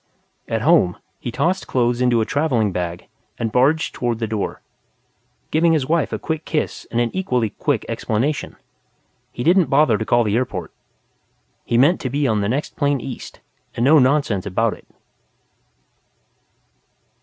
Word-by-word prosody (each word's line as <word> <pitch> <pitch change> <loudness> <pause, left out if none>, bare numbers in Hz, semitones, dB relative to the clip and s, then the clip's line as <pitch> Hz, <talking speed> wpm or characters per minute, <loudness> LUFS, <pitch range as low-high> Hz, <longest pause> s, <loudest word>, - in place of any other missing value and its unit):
At - - -2
home, 90 -1 +4 0.2
he 120 - -5
tossed 180 +9 -1
clothes 120 -1 +1
into 120 -2 +3
a - - 0
travelling 125 -9 +1
bag 90 -1 -4 0.3
and 115 -2 -2
barged 145 +7 +2
toward 120 -4 -2
the 115 - -2
door, 110 -2 -3 0.9
giving 165 +1 +3
his 150 -5 +1
wife 165 -2 +1
a - - -2
quick 160 -1 -4
kiss 155 -2 -3
and 120 - -1
an 120 -1 +1
equally 125 - 0
quick - - -1
explanation. 130 +8 -2 0.8
He 120 - -5
didn't 175 +3 +4
bother 140 -6 +3
to 110 - -2
call 120 +1 +3
the 105 -1 0
airport. 130 - -3 0.9
He 120 - +1
meant 145 +9 +4
to 130 - -2
be 140 +2 0
on 110 -3 +1
the 100 - -1
next 140 +6 -2
plane 145 -2 +1
east, 130 0 -8 0.3
and 120 - -1
no 155 +3 +6
nonsense 130 -8 +1
about 110 +3 +1
it.... - - -15
125 Hz, 160 wpm, -20 LUFS, 115-150 Hz, 0.9 s, no